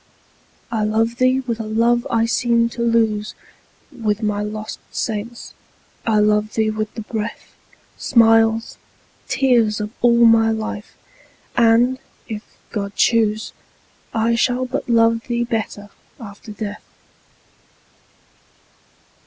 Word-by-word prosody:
I 220 Hz, -2 st, 0 dB
love 225 Hz, +2 st, 0 dB
thee 255 Hz, +1 st, +3 dB
with 235 Hz, -3 st, -4 dB
a -, -, -3 dB
love 235 Hz, +2 st, +2 dB
I 230 Hz, -1 st, +2 dB
seemed 235 Hz, 0 st, +1 dB
to 235 Hz, -, -6 dB
lose 225 Hz, -3 st, +1 dB, 0.6 s
With 215 Hz, -1 st, -2 dB
my 210 Hz, -1 st, 0 dB
lost 215 Hz, +1 st, -5 dB
saints, 225 Hz, +2 st, -4 dB, 0.5 s
I 220 Hz, -1 st, +3 dB
love 210 Hz, 0 st, +2 dB
thee 220 Hz, -1 st, +1 dB
with 215 Hz, 0 st, -3 dB
the 225 Hz, -, -5 dB
breath, 220 Hz, 0 st, -6 dB, 0.5 s
Smiles, 225 Hz, -2 st, +3 dB, 0.5 s
tears, 235 Hz, -6 st, +2 dB
of 210 Hz, 0 st, -4 dB
all 235 Hz, 0 st, +5 dB
my 225 Hz, -1 st, +5 dB
life! 220 Hz, -1 st, -4 dB, 0.6 s
and, 240 Hz, +2 st, +4 dB, 0.3 s
if 215 Hz, -3 st, -5 dB, 0.3 s
God 200 Hz, -2 st, -4 dB
choose, 220 Hz, -2 st, +1 dB, 0.6 s
I 230 Hz, +1 st, +1 dB
shall 250 Hz, +2 st, +1 dB
but 255 Hz, 0 st, -4 dB
love 230 Hz, 0 st, +3 dB
thee 240 Hz, -1 st, 0 dB
better 220 Hz, -3 st, -4 dB, 0.3 s
after 215 Hz, -1 st, -10 dB
death. 210 Hz, -1 st, -6 dB
225 Hz, 120 wpm, -20 LUFS, 215-235 Hz, 0.6 s, all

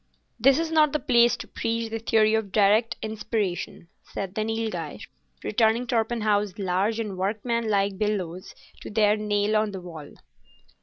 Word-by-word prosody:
"This 265 Hz, +4 st, +5 dB
is 325 Hz, 0 st, -1 dB
not 305 Hz, -2 st, +4 dB
the 300 Hz, -, +1 dB
place 240 Hz, -3 st, +4 dB
to -, -, -8 dB
preach 230 Hz, -1 st, -3 dB
the 225 Hz, -, -3 dB
theory 220 Hz, -1 st, +3 dB
of 220 Hz, -3 st, -1 dB
direct 215 Hz, +3 st, +3 dB
inspiration," 210 Hz, -5 st, -3 dB
said 195 Hz, -2 st, -6 dB
the 215 Hz, -, -1 dB
Nilghai, 220 Hz, -8 st, -3 dB, 0.4 s
returning 225 Hz, +2 st, +2 dB
Torpenhow's 220 Hz, -4 st, 0 dB
large 200 Hz, +3 st, 0 dB
and 205 Hz, -5 st, -4 dB
workmanlike 205 Hz, -1 st, 0 dB
bellows 190 Hz, -4 st, -3 dB, 0.3 s
to -, -, -8 dB
their 210 Hz, -1 st, +3 dB
nail 210 Hz, 0 st, 0 dB
on 215 Hz, 0 st, +2 dB
the 190 Hz, -, -6 dB
wall. 160 Hz, -5 st, -10 dB
215 Hz, 150 wpm, -25 LUFS, 200-225 Hz, 0.4 s, This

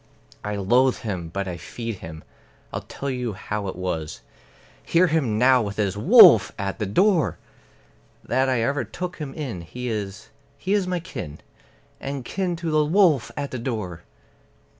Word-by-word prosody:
I 105 Hz, 0 st, -3 dB
loathe 120 Hz, +7 st, +3 dB
him, 95 Hz, -8 st, -4 dB
but 100 Hz, +3 st, -3 dB
I 90 Hz, -2 st, -4 dB
feed 115 Hz, +5 st, -6 dB
him; 80 Hz, -1 st, -9 dB, 0.5 s
I'll -, -, -3 dB
tell 140 Hz, 0 st, -5 dB
you 125 Hz, -3 st, -3 dB
how 105 Hz, +1 st, -4 dB
it 95 Hz, -, -4 dB
was 85 Hz, -4 st, -4 dB, 0.6 s
(Hear 170 Hz, +2 st, +3 dB
him 150 Hz, -11 st, +1 dB
now 125 Hz, +2 st, +5 dB
with 100 Hz, -2 st, -4 dB
his 100 Hz, -2 st, 0 dB
"Wolf!" 190 Hz, -, +8 dB
at 100 Hz, +1 st, -3 dB
the 105 Hz, -, -1 dB
door!) 155 Hz, -, +2 dB, 0.9 s
That 130 Hz, +2 st, +1 dB
I 125 Hz, -3 st, +1 dB
ever 140 Hz, +2 st, 0 dB
took 175 Hz, -, -6 dB
him 150 Hz, -4 st, -5 dB
in; 130 Hz, -, -5 dB
he 125 Hz, +9 st, -6 dB
is 105 Hz, -2 st, -5 dB, 0.3 s
he 190 Hz, -, -1 dB
is 200 Hz, -3 st, +1 dB
my 180 Hz, -1 st, -1 dB
kin, 75 Hz, -, -7 dB, 0.6 s
And 135 Hz, -2 st, -5 dB
kin 185 Hz, +2 st, -2 dB
to 165 Hz, -1 st, -3 dB
the 155 Hz, 0 st, +3 dB
wolf 155 Hz, -, +3 dB
at 140 Hz, -1 st, -3 dB
the 130 Hz, -, -4 dB
door! 105 Hz, -9 st, -4 dB
120 Hz, 170 wpm, -24 LUFS, 100-155 Hz, 0.9 s, Wolf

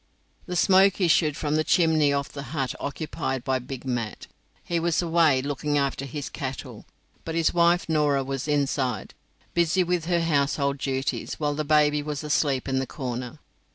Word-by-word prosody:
The 180 Hz, -, -4 dB
smoke 190 Hz, +2 st, +4 dB
issued 160 Hz, -4 st, +3 dB
from 150 Hz, -1 st, 0 dB
the 155 Hz, -, +2 dB
chimney 160 Hz, -4 st, +3 dB
of 140 Hz, 0 st, -2 dB
the 140 Hz, -, -6 dB, 0.2 s
hut 135 Hz, -2 st, -1 dB
occupied 140 Hz, -3 st, -3 dB
by 130 Hz, 0 st, 0 dB
Big 130 Hz, +1 st, -8 dB
Mat. 120 Hz, -4 st, -3 dB, 0.4 s
He 170 Hz, -1 st, -1 dB
was 170 Hz, -1 st, +1 dB
away 165 Hz, -6 st, +3 dB
looking 145 Hz, +1 st, -1 dB
after 140 Hz, -1 st, -1 dB
his 140 Hz, +1 st, -5 dB
cattle, 135 Hz, -3 st, -7 dB, 0.4 s
but 165 Hz, -, -5 dB
his 165 Hz, -1 st, +2 dB
wife 170 Hz, +1 st, +3 dB
Norah 150 Hz, -3 st, +2 dB
was 135 Hz, +1 st, -4 dB
inside, 135 Hz, -6 st, -1 dB, 0.4 s
busy 170 Hz, +2 st, +2 dB
with 175 Hz, -2 st, -1 dB
her 170 Hz, 0 st, +1 dB
household 140 Hz, -3 st, +1 dB
duties, 135 Hz, 0 st, -2 dB
while 150 Hz, -1 st, -1 dB
the 155 Hz, +1 st, -2 dB
baby 150 Hz, 0 st, +3 dB
was 150 Hz, 0 st, -4 dB
asleep 145 Hz, -3 st, 0 dB
in 135 Hz, 0 st, 0 dB
the 130 Hz, -, -2 dB
corner. 125 Hz, -4 st, -5 dB
145 Hz, 170 wpm, -25 LUFS, 135-165 Hz, 0.4 s, smoke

